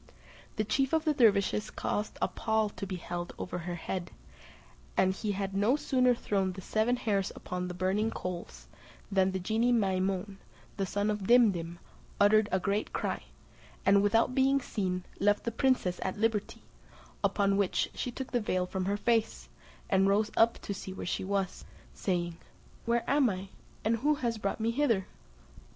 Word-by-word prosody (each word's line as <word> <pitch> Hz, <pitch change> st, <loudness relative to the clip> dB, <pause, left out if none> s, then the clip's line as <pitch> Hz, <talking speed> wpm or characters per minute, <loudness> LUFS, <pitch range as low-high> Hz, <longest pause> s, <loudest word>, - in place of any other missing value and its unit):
The 215 Hz, -, 0 dB
chief 265 Hz, +7 st, 0 dB
of 320 Hz, 0 st, +2 dB
the 305 Hz, -, +3 dB
dervises 210 Hz, -5 st, +3 dB
caused 210 Hz, +1 st, -3 dB
a -, -, +3 dB
pall 220 Hz, -1 st, 0 dB
to 200 Hz, -, -7 dB
be 185 Hz, -, -3 dB
held 175 Hz, 0 st, -5 dB
over 180 Hz, -, -4 dB
her 175 Hz, +1 st, -4 dB
head, 175 Hz, +1 st, -4 dB, 0.9 s
and 190 Hz, 0 st, +4 dB
he 205 Hz, +1 st, -2 dB
had 195 Hz, 0 st, -3 dB
no 205 Hz, +7 st, +3 dB
sooner 255 Hz, -4 st, +2 dB
thrown 195 Hz, -4 st, -1 dB
the 190 Hz, -, -8 dB
seven 220 Hz, +6 st, +1 dB
hairs 205 Hz, -6 st, 0 dB
upon 180 Hz, 0 st, -4 dB
the 180 Hz, -, -6 dB
burning 190 Hz, +4 st, +1 dB
coals, 180 Hz, -5 st, -6 dB, 0.4 s
than 190 Hz, -1 st, +3 dB
the 190 Hz, -, -2 dB
genie 220 Hz, +6 st, +1 dB
Maimoun, 195 Hz, -2 st, 0 dB, 0.4 s
the 195 Hz, -1 st, -2 dB
son 205 Hz, +2 st, 0 dB
of 205 Hz, -2 st, -3 dB
Dimdim, 195 Hz, -9 st, +4 dB, 0.4 s
uttered 210 Hz, +1 st, +5 dB
a 190 Hz, -, +2 dB
great 200 Hz, +3 st, -1 dB
cry, -, -, -2 dB, 0.6 s
and 200 Hz, 0 st, +6 dB
without 225 Hz, +4 st, +3 dB
being 270 Hz, +1 st, +3 dB
seen, 185 Hz, -7 st, -2 dB, 0.2 s
left 205 Hz, +1 st, +2 dB
the 230 Hz, -, -2 dB
princess 230 Hz, -7 st, +1 dB
at 190 Hz, -, -2 dB
liberty; 220 Hz, -1 st, -1 dB, 0.6 s
upon 200 Hz, -1 st, +2 dB
which, 200 Hz, -2 st, +1 dB
she -, -, -3 dB
took 260 Hz, +2 st, -6 dB
the 245 Hz, -, +1 dB
veil 185 Hz, -3 st, 0 dB
from 185 Hz, 0 st, -3 dB
her 200 Hz, +2 st, 0 dB
face, 225 Hz, +1 st, 0 dB, 0.4 s
and 195 Hz, 0 st, +3 dB
rose 210 Hz, +2 st, +2 dB
up 230 Hz, +1 st, +4 dB
to 200 Hz, -, -3 dB
see 190 Hz, -, -7 dB
where -, -, -6 dB
she -, -, -2 dB
was, 195 Hz, -1 st, -2 dB, 0.3 s
saying, 175 Hz, -3 st, -2 dB, 0.5 s
"Where 235 Hz, 0 st, +1 dB
am 280 Hz, -3 st, +4 dB
I, 190 Hz, 0 st, -5 dB, 0.4 s
and 230 Hz, +1 st, +2 dB
who 295 Hz, +5 st, +2 dB, 0.2 s
brought 200 Hz, +1 st, -2 dB
me 225 Hz, +1 st, +1 dB
hither?" 230 Hz, -7 st, +1 dB
205 Hz, 170 wpm, -30 LUFS, 190-230 Hz, 0.9 s, and